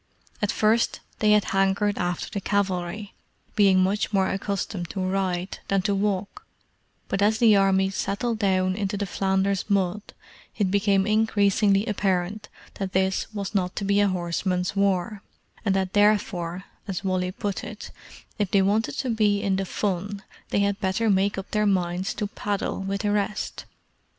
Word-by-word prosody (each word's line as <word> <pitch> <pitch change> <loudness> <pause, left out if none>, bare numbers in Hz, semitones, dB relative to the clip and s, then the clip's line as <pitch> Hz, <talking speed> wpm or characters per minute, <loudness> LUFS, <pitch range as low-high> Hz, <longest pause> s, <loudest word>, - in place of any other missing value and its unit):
At 210 - +1
first 220 +2 +2 0.2
they 210 -1 +4
had 210 -1 +4
hankered 195 +2 +1
after 175 0 -2
the 200 - -4
cavalry, 195 0 -1 0.4
being 195 -3 +5
much 200 +3 0
more 190 -2 +2
accustomed 195 -2 -3
to 195 - -5
ride 185 -1 -1
than 195 -1 +1
to 200 0 +1
walk: 200 0 -2 0.6
but 195 - -1
as 215 +2 +3
the 225 -2 +6
armies 195 0 +2
settled 225 +3 -1
down 185 -2 +2
into 200 0 -2
the 200 - -1
Flanders 195 +1 0
mud 200 0 +1 0.6
it 200 -4 +1
became 200 -1 +3
increasingly 205 -1 +3
apparent 200 -1 -1 0.3
that 195 -1 -3
this 190 +2 0
was 205 -1 -4
not 185 -3 0
to 200 - -3
be 200 +1 +3
a 205 - +4
horseman's 180 +1 -1
war, 195 0 0 0.4
and 195 -3 +1
that 190 -1 -1
therefore, 195 -4 +1 0.2
as 195 -1 -3
Wally 185 -1 0
put 200 +1 -4
it, - - -8 0.5
if 205 -3 +1
they 195 -1 +3
wanted 210 +3 +1
to 260 - -2
be 210 -2 +2
in 190 -1 +1
the 195 - -1
fun, 200 +1 -3 0.3
they 200 - +1
had 200 0 0
better 205 +3 +1
make 195 +1 +1
up 195 - -6
their 210 0 +2
minds 185 0 0
to 210 - -2
paddle 205 0 -3
with 195 +1 -2
the 210 -1 0
rest. 210 0 -2
195 Hz, 165 wpm, -25 LUFS, 190-205 Hz, 0.6 s, the